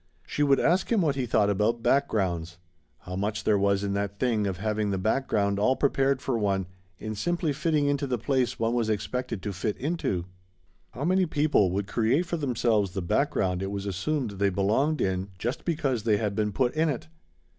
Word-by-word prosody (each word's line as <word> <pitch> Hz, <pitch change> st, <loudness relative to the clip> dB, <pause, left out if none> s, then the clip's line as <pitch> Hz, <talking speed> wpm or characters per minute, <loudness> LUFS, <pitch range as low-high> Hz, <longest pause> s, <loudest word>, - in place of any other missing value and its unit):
She -, -, -3 dB
would 140 Hz, -2 st, +4 dB
ask 180 Hz, +7 st, +2 dB
him 225 Hz, -4 st, +3 dB
what 155 Hz, -4 st, +2 dB
he 130 Hz, -3 st, -2 dB
thought 105 Hz, -2 st, +3 dB
about 110 Hz, +4 st, 0 dB
backgrounds. 90 Hz, -11 st, 0 dB, 0.4 s
How 90 Hz, -, -7 dB
much 105 Hz, +2 st, -2 dB
there 105 Hz, -1 st, +3 dB
was 100 Hz, 0 st, +2 dB
in 100 Hz, -1 st, -1 dB
that 100 Hz, 0 st, -2 dB
thing 110 Hz, -3 st, +1 dB
of 95 Hz, -2 st, -3 dB
having 105 Hz, +1 st, -1 dB
the 95 Hz, -, 0 dB
background 100 Hz, -1 st, 0 dB
all 130 Hz, +6 st, +3 dB
prepared 135 Hz, -1 st, +1 dB
for 125 Hz, -4 st, 0 dB
one, 100 Hz, -2 st, 0 dB, 0.3 s
in 110 Hz, 0 st, -5 dB
simply 170 Hz, -, -1 dB
fitting 155 Hz, 0 st, +1 dB
into 145 Hz, 0 st, 0 dB
the 125 Hz, -2 st, 0 dB
place 130 Hz, +1 st, 0 dB
one 115 Hz, +1 st, 0 dB
was 115 Hz, -2 st, 0 dB
expected 110 Hz, 0 st, -2 dB
to 105 Hz, -, -3 dB
fit 105 Hz, +3 st, -2 dB
into. 135 Hz, -, -2 dB, 0.6 s
How 140 Hz, -, -5 dB
many 185 Hz, +1 st, +3 dB
people 150 Hz, -, +2 dB
would 100 Hz, +2 st, -1 dB
create 120 Hz, -, +1 dB
for 170 Hz, 0 st, -2 dB
themselves 115 Hz, -, +1 dB
the 95 Hz, -, -3 dB
background 90 Hz, +1 st, 0 dB
it 95 Hz, -, -2 dB
was 100 Hz, 0 st, -4 dB
assumed 110 Hz, -, -2 dB
they 100 Hz, 0 st, +1 dB
belonged 110 Hz, +11 st, +1 dB
in 95 Hz, +1 st, -1 dB
just 120 Hz, +7 st, -3 dB
because 145 Hz, -8 st, 0 dB
they 105 Hz, -1 st, +2 dB
had 105 Hz, -1 st, -1 dB
been 105 Hz, -1 st, 0 dB
put 125 Hz, +4 st, +1 dB
in 160 Hz, +1 st, +2 dB
it? 135 Hz, -1 st, -4 dB
110 Hz, 200 wpm, -27 LUFS, 100-140 Hz, 0.6 s, would